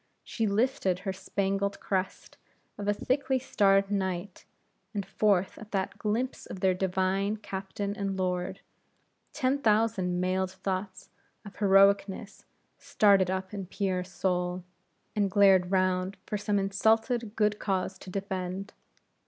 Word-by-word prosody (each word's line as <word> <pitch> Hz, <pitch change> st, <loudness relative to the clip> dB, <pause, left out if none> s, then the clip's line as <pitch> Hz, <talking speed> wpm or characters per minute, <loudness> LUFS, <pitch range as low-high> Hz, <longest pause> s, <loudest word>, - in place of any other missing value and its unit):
She 225 Hz, -2 st, -2 dB
lifted 200 Hz, -3 st, +1 dB
her 190 Hz, -, -1 dB
spangled 195 Hz, +1 st, -2 dB
crest 190 Hz, -1 st, -3 dB, 0.4 s
of 205 Hz, 0 st, -6 dB
a -, -, +4 dB
thickly 265 Hz, +4 st, 0 dB
starred 195 Hz, -5 st, +2 dB
night, 190 Hz, -1 st, -3 dB, 0.5 s
and 200 Hz, -2 st, -2 dB
forth 195 Hz, -1 st, +1 dB
at 215 Hz, -, -11 dB
that 195 Hz, +1 st, -2 dB
glimpse 230 Hz, +5 st, -2 dB
of 190 Hz, -, -7 dB
their 185 Hz, 0 st, +3 dB
divine 190 Hz, +2 st, 0 dB
Captain 200 Hz, 0 st, -5 dB
and 195 Hz, -2 st, -2 dB
Lord, 185 Hz, 0 st, -2 dB, 0.7 s
ten 265 Hz, +2 st, 0 dB
thousand 210 Hz, -6 st, +2 dB
mailed 185 Hz, +1 st, 0 dB
thoughts 190 Hz, 0 st, -4 dB, 0.3 s
of 200 Hz, -, -11 dB
heroicness 200 Hz, +1 st, +3 dB, 0.3 s
started 200 Hz, -3 st, +4 dB
up 190 Hz, +1 st, -3 dB
in 195 Hz, -3 st, -5 dB
Pierre's 185 Hz, -2 st, -2 dB
soul, 180 Hz, -1 st, -1 dB, 0.5 s
and 205 Hz, -2 st, +2 dB
glared 190 Hz, -2 st, +5 dB
round 185 Hz, 0 st, +1 dB
for -, -, -3 dB
some 205 Hz, 0 st, 0 dB
insulted 220 Hz, +3 st, +1 dB
good 210 Hz, -1 st, +1 dB
cause 190 Hz, -1 st, -2 dB
to -, -, -10 dB
defend. 190 Hz, 0 st, -4 dB
195 Hz, 130 wpm, -29 LUFS, 185-205 Hz, 0.7 s, glared